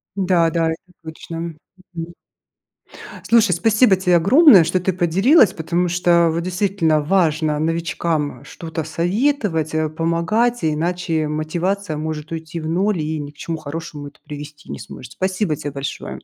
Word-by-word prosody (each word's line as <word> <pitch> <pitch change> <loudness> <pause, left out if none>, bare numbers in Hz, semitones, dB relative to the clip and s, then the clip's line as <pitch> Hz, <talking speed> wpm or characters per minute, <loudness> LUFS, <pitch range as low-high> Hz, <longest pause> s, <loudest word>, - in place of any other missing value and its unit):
Да-да. 170 -4 +2
Это 180 +3 -9
точно. 165 +1 -7 1.7
Слушай, 230 -5 +4
спасибо 215 +4 +4
тебе 180 -2 +3
огромное, 210 - +7
что 180 +3 0
ты 190 - 0
поделилась, 190 - +4
потому 170 +2 -1
что 170 -1 +3
вот 165 +1 -1
действительно 180 -4 +1
важно 155 -2 +1
новичкам 165 -1 -2
что-то 160 -1 -6
советовать, 175 - -1
э, 155 0 +1
помогать, 170 +10 0
иначе 160 0 -1
мотивация 170 +4 -2
может 155 0 -5
уйти 160 +1 -6
в 155 - -5
ноль 185 +3 0
и 155 +1 -3
ни 145 -1 -7
к 145 - -30
чему 165 +2 -4
хорошему 155 -1 -7
это 140 - -16
привести 150 0 -10
не - - -6
сможет. 130 - -10
Спасибо 185 -3 -1
тебе 145 0 -6
большое. 140 0 -6
165 Hz, 140 wpm, -20 LUFS, 155-185 Hz, 1.7 s, огромное